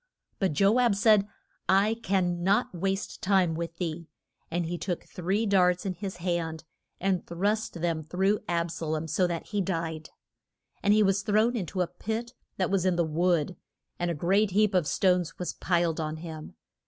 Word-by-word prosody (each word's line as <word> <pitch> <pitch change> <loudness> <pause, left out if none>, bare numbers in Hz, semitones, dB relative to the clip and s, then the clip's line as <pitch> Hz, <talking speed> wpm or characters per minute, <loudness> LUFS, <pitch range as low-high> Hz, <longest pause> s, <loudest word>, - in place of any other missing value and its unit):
But 190 -6 +1
Jo 200 - +4
ab 240 -5 +3
said, 205 -1 +4 0.4
I 200 +4 +4
can 180 -4 0
not 205 +6 +2
waste 195 +3 -2
time 185 -4 +3
with 165 +1 -5
thee. 170 -2 -4 0.4
And 175 +1 -1
he 170 +2 -3
took 175 0 -3
three 190 +5 -1
darts 180 -3 +3
in 190 - -1
his 190 0 -6
hand 170 -2 -2 0.4
and 190 -1 0
thrust 205 +6 -1
them 165 -1 -1
through 190 +6 +1
Ab 170 -1 0
sa 165 - -5
lom, 155 +1 -2
so 180 +4 +2
that 170 -2 -4
he 205 -1 0
died. 165 -4 -3 0.7
And 205 - +3
he 215 - +5
was 195 0 +2
thrown 215 +3 +2
in 195 -7 -2
to 185 - -2
a 180 - +1
pit 220 +7 -4 0.2
that 185 0 0
was 195 -3 +2
in 185 -1 +2
the 170 -1 +2
wood, 170 +1 +1 0.4
and 175 0 0
a 170 - -1
great 195 +7 +2
heap 205 +2 +2
of 180 -5 +2
stones 180 -1 +1
was 180 - -3
piled 170 -2 0
on 155 0 -3
him. 160 -1 -8
180 Hz, 190 wpm, -28 LUFS, 170-200 Hz, 0.7 s, he